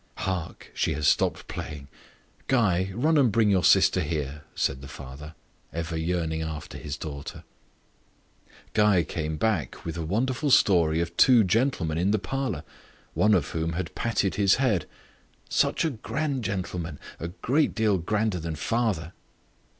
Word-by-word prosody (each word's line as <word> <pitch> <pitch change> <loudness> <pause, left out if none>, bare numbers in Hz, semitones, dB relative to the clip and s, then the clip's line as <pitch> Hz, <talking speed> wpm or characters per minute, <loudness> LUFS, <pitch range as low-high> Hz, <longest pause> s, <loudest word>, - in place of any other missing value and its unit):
"Hark! 90 -3 -4
she - - 0
has 75 -1 0
stopped - - +2
playing. 70 -2 -7 0.6
Guy, 95 -7 +2
run 150 +6 +3
and 125 -5 +4
bring 110 0 +3
your 95 -3 +3
sister - - +5
here," 75 -2 -3
said 65 0 -1
the 70 - -9
father, 70 +4 -10 0.4
ever 80 0 -4
yearning 80 -1 -1
after 80 -2 -6
his 75 -1 -5
darling. 70 -3 -7 1.3
Guy 105 -5 +4
came 80 0 -3
back 85 - -1
with 85 0 -4
a 85 - -3
wonderful 125 - 0
story 85 - +4
of 85 0 -4
two 125 -4 +7
gentlemen 95 - +1
in 90 +3 +2
the 105 - +3
parlour, 110 - -3 0.5
one 105 0 +4
of 85 -6 0
whom 80 0 -2
had 85 0 -4
patted 100 -4 0
his 100 -1 +5
head 110 - +1 0.6
"Such - - +2
a 160 - +1
grand 140 +2 -3
gentleman, 90 -5 -3 0.2
a 85 - -4
great 130 - 0
deal 110 -4 +2
grander 105 +2 0
than 80 0 -4
father!" 95 -3 -1
90 Hz, 150 wpm, -26 LUFS, 80-110 Hz, 1.3 s, two